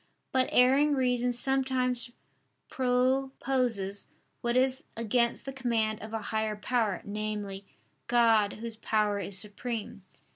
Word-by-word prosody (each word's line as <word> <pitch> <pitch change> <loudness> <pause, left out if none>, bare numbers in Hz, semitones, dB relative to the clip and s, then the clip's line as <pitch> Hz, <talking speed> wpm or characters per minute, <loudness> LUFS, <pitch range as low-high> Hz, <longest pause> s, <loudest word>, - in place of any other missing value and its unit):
But 260 -1 +2
erring 275 +4 +5
reason 250 -2 +1
sometimes 255 -1 0 0.6
proposes 255 -5 0 0.3
what 240 +1 0
is 260 +1 +1
against 235 +1 0
the 270 - -5
command 230 -5 -1
of 215 +1 -8
a 225 -1 -4
higher 220 -1 0
power, 215 -1 -1
namely, 205 -1 -4 0.4
God 225 -4 +4
Whose 225 0 -7
power 210 -2 0
is 195 0 -2
supreme. 220 +2 -1
235 Hz, 115 wpm, -29 LUFS, 215-255 Hz, 0.6 s, erring